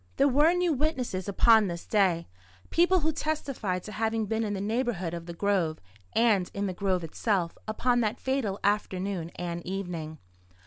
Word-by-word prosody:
There 275 Hz, -, +5 dB
were 295 Hz, +5 st, +5 dB
new 355 Hz, -2 st, +2 dB
witnesses 255 Hz, -, -1 dB
upon 220 Hz, +1 st, +5 dB
this 170 Hz, -1 st, -5 dB
day, 185 Hz, -5 st, +2 dB, 0.4 s
people 355 Hz, +2 st, +4 dB
who 315 Hz, +1 st, +1 dB
testified 275 Hz, -, -2 dB
to 215 Hz, -, -8 dB
having 220 Hz, +1 st, 0 dB
been 220 Hz, +2 st, -1 dB
in 205 Hz, -2 st, -2 dB
the -, -, -3 dB
neighbourhood 210 Hz, -5 st, -1 dB
of 170 Hz, 0 st, -6 dB
the -, -, -5 dB
grove, 180 Hz, -5 st, +1 dB, 0.4 s
and 215 Hz, -6 st, +3 dB
in 200 Hz, 0 st, -1 dB
the 190 Hz, -, -2 dB
grove 185 Hz, -1 st, 0 dB
itself, 175 Hz, +1 st, -1 dB
upon 240 Hz, +3 st, +1 dB
that 220 Hz, +1 st, -1 dB
fatal 260 Hz, -7 st, -1 dB
afternoon 195 Hz, -4 st, -1 dB
and 170 Hz, -1 st, -4 dB
evening. 175 Hz, -5 st, -4 dB
205 Hz, 170 wpm, -28 LUFS, 180-245 Hz, 0.4 s, There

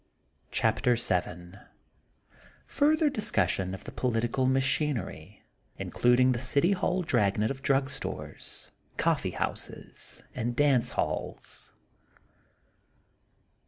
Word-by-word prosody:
CHAPTER 125 Hz, -, +2 dB
Vn 90 Hz, -4 st, -2 dB, 1.0 s
ITTRTHBR 300 Hz, 0 st, +2 dB
DISCUSSION 95 Hz, -, +2 dB
OP -, -, -10 dB
THE -, -, -8 dB
POLITICAL 120 Hz, +1 st, 0 dB
MAOHIITEKI, 130 Hz, -, 0 dB, 0.4 s
INCLUDING 125 Hz, +1 st, +3 dB
THE 120 Hz, -, -1 dB
CITY 140 Hz, +7 st, +2 dB
HALL 185 Hz, -1 st, 0 dB
DRAG 105 Hz, -, +1 dB
NET 110 Hz, +4 st, +1 dB
OP 135 Hz, 0 st, -6 dB
DRUG 135 Hz, 0 st, +2 dB
STORES, 140 Hz, -, -5 dB, 0.3 s
COPPEB -, -, +1 dB
HOUSES -, -, -3 dB
AND 120 Hz, +1 st, -2 dB
DANCE 140 Hz, -3 st, +3 dB
HALLS. -, -, -3 dB
125 Hz, 95 wpm, -29 LUFS, 105-140 Hz, 1.0 s, INCLUDING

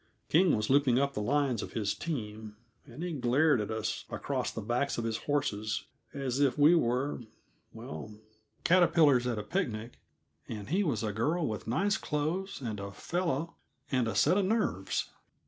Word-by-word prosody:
King 175 Hz, +2 st, +5 dB
was 105 Hz, 0 st, -1 dB
looping 135 Hz, -3 st, +4 dB
up 140 Hz, +1 st, +1 dB
the 105 Hz, -, -2 dB
lines 135 Hz, 0 st, +1 dB
of -, -, -7 dB
his 105 Hz, -3 st, 0 dB
team, 110 Hz, -8 st, -5 dB, 0.3 s
and 135 Hz, +6 st, -8 dB
he 180 Hz, -1 st, -3 dB
glared 135 Hz, 0 st, +3 dB
at 105 Hz, -, -4 dB
us 110 Hz, -1 st, -2 dB
across -, -, -2 dB
the -, -, -5 dB
backs 120 Hz, +6 st, -1 dB
of 120 Hz, -, -1 dB
his 115 Hz, -1 st, -1 dB
horses 110 Hz, -8 st, 0 dB, 0.3 s
as 135 Hz, -2 st, -2 dB
if 140 Hz, -1 st, +3 dB
we 150 Hz, +3 st, +7 dB
were 130 Hz, -3 st, +1 dB, 0.5 s
well, 80 Hz, +8 st, -8 dB, 0.5 s
caterpillars 165 Hz, -8 st, +5 dB
at 120 Hz, -3 st, -1 dB
a 105 Hz, -, -3 dB
picnic 115 Hz, -, -3 dB, 0.5 s
and 105 Hz, -1 st, -6 dB
he 190 Hz, +6 st, +2 dB
was 130 Hz, -, -1 dB
a 105 Hz, -2 st, -1 dB
girl 155 Hz, -, 0 dB
with 110 Hz, 0 st, -5 dB
nice 195 Hz, -, +1 dB
clothes 155 Hz, +5 st, -2 dB
and 110 Hz, -5 st, -4 dB
a 100 Hz, 0 st, -5 dB
fellow 165 Hz, -, -2 dB, 0.3 s
and 125 Hz, -4 st, +2 dB
a 110 Hz, -, -2 dB
set 190 Hz, -, +4 dB
of 195 Hz, -, +1 dB
nerves. 205 Hz, -, 0 dB
130 Hz, 175 wpm, -31 LUFS, 110-160 Hz, 0.5 s, we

